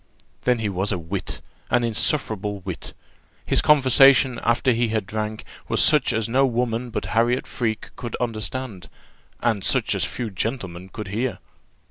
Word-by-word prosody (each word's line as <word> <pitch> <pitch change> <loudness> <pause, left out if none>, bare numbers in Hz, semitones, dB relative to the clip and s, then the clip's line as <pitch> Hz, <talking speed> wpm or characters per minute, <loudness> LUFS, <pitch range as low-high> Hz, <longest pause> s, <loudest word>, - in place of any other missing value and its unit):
Then 125 -1 +3
he 110 -2 -2
was 95 +1 0
a 100 - 0
wit 90 +3 -5 0.3
an 120 0 +2
insufferable 110 -4 -1
wit. 90 -2 -6 0.5
His - - +3
conversation 135 -3 +5
after 120 +3 +2
he 120 0 +1
had 110 -2 -1
drank 110 +2 -4 0.2
was - - 0
such 150 -4 +4
as 110 0 0
no 130 +4 +2
woman 120 -1 -1
but - - -4
Harriot 120 +3 +2
Freke 110 -3 -3
could 120 - -5
understand, 110 -3 -4 0.5
and 110 -5 0
such - - +2
as - - 0
few 120 -4 -3
gentlemen 95 -4 -4
could 105 0 -7
hear. 115 +5 -2
115 Hz, 155 wpm, -23 LUFS, 105-125 Hz, 0.5 s, conversation